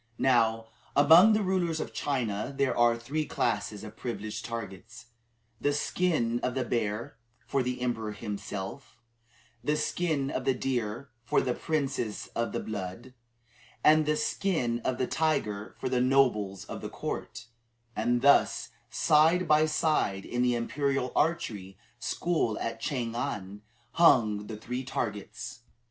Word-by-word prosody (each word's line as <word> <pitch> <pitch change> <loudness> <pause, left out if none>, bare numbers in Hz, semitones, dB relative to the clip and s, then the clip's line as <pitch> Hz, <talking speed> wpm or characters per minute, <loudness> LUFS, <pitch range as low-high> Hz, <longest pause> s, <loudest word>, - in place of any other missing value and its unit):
Now, 115 -3 +2 0.3
among 165 +9 +8
the 215 -1 +2
rulers 180 -4 0
of - - -5
China 120 -5 -1
there 140 -1 +1
are 120 -1 +4
three 140 +7 -2
classes 105 -2 -1
of 105 0 -9
privileged 110 -3 -5
targets 115 0 -7 0.5
the 145 - +1
skin 145 -6 0
of 125 0 -2
the 130 - 0
bear 115 0 -2 0.3
for 135 - 0
the 125 0 -2
emperor 115 -3 -1
himself, 105 +3 -6 0.7
the 150 +4 +1
skin 150 -3 -1
of - - -2
the 135 - +2
deer 120 0 -2
for - - +2
the 125 - 0
princes 135 -9 -2
of 115 0 -1
the - - -2
blood, 105 +4 -6 0.7
and 155 0 +5
the 150 0 +2
skin 130 -15 0
of 125 +1 -2
the 130 - +1
tiger 115 -10 -1
for - - -3
the 125 -1 +1
nobles 125 -7 +2
of - - -7
the - - -5
court; - - -5 0.5
and 120 +3 +1
thus, 140 0 +4 0.2
side 160 +7 +4
by 155 0 +5
side, 155 -11 +1
in 120 - -2
the 125 -1 +3
Imperial 135 +1 -1
Archery 110 - -1 0.2
School 115 - 0
at 115 0 -3
Chang 120 -4 -2
an, 100 -4 -4 0.3
hung 110 -11 +4
the 110 - -6
three 125 +4 -4
targets. 115 -1 -4
125 Hz, 145 wpm, -29 LUFS, 110-145 Hz, 0.7 s, among